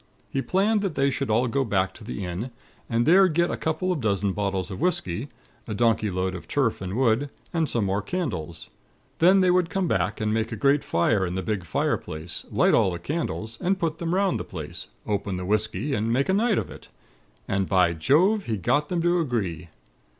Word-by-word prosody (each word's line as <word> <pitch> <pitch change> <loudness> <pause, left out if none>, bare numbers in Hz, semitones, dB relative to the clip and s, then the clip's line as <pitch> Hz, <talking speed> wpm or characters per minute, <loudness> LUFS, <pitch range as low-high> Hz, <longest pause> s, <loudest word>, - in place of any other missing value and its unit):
He 135 - 0
planned 205 +7 +2
that 195 -6 -2
they 140 0 +2
should 135 -1 -2
all 115 +4 +2
go 135 +3 +1
back 95 -5 0
to 110 - -13
the 105 -3 -5
inn, 90 +8 -4 0.4
and 115 0 +1
there 190 +5 +6
get 170 +1 +1
a - - -1
couple 160 +4 -1
of 165 -6 -1
dozen 100 -3 0
bottles 100 -1 -2
of 95 - -6
whisky, 135 - 0 0.4
a 110 - -3
donkey 110 -1 +2
load 95 0 -1
of 90 - -8
turf 130 -9 0
and 95 +1 -4
wood, 130 +2 +2 0.2
and 165 -3 +1
some 115 -4 0
more 100 +2 0
candles. 100 - -4 0.5
Then 185 +3 +6
they 185 -1 +4
would 180 -2 +2
come 195 -3 0
back, 95 - 0
and 110 0 0
make 110 0 -1
a - - -2
great 140 +6 +2
fire 95 +4 +2
in 90 -1 -2
the 95 - -2
big 105 -4 -2
fire - - 0
place, 80 +2 -6
light - - +3
all - - +4
the 85 - -3
candles, 115 - -4
and 190 +2 +1
put 165 -3 -2
them 170 +1 -1
'round 195 -1 +1
the - - -3
place, - - -7 0.2
open 100 -2 -2
the 90 - -4
whisky 110 +8 0
and 110 -1 0
make 135 +7 +1
a - - +4
night 215 +1 +2
of - - -2
it. - - -12 0.6
And, 95 -1 0
by 90 -3 +4
Jove! 175 - +3
he 110 -2 -1
got 145 - +1
them 175 -2 -1
to 175 0 +3
agree. 100 - -2
115 Hz, 220 wpm, -25 LUFS, -, 0.6 s, there